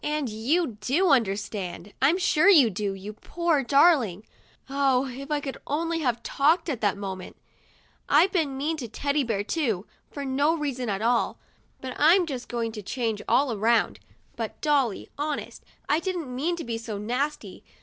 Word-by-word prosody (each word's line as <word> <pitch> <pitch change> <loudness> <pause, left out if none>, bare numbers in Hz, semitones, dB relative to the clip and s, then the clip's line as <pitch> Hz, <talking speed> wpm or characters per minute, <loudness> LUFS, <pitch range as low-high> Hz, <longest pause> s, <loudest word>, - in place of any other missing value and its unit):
And 300 -3 -1
you 235 +4 0
do 320 - +2
understand; 200 -5 -1
I'm 290 +7 +4
sure 370 -1 +4
you 285 - +7
do, 200 +1 -2
you 200 +2 -8
poor 335 +5 0
dar 285 +7 +6
ling! 210 - -5 0.2
' - - -32
(Oh, 270 -1 +2
if 270 +2 -8
I 300 -1 +1
could 275 -2 -6
only 330 +3 -1
have 245 -6 -1
talked 315 +5 +2
at 255 -6 -3
that 205 -2 +1
moment 190 -2 -6 0.3
!) - - -33
" - - -38
I've 380 - +5
been 300 -7 0
mean 310 +4 -1
to 250 -6 -5
Teddy 280 +6 -1
Bear 220 -5 -1
too, 225 - -1 0.2
for 285 -1 -6
no 285 +5 +1
reason 260 -6 -3
at 200 +1 -2
all; 235 0 +1 0.4
but 260 -1 -5
I'm 345 +5 +5
just 260 -6 -6
going 230 -1 -2
to 215 -1 -7
change 225 0 -2
all 265 -2 +3
around. 225 +3 +1 0.4
But, - - -5
Dolly, 280 -9 0
honest, 295 0 -4 0.2
I 300 - +2
didn't 340 -8 -4
mean 325 +7 0
to 335 - -6
be 230 -1 -4
so 225 -3 -5
nasty. 255 +8 -3
265 Hz, 185 wpm, -26 LUFS, 220-300 Hz, 0.4 s, you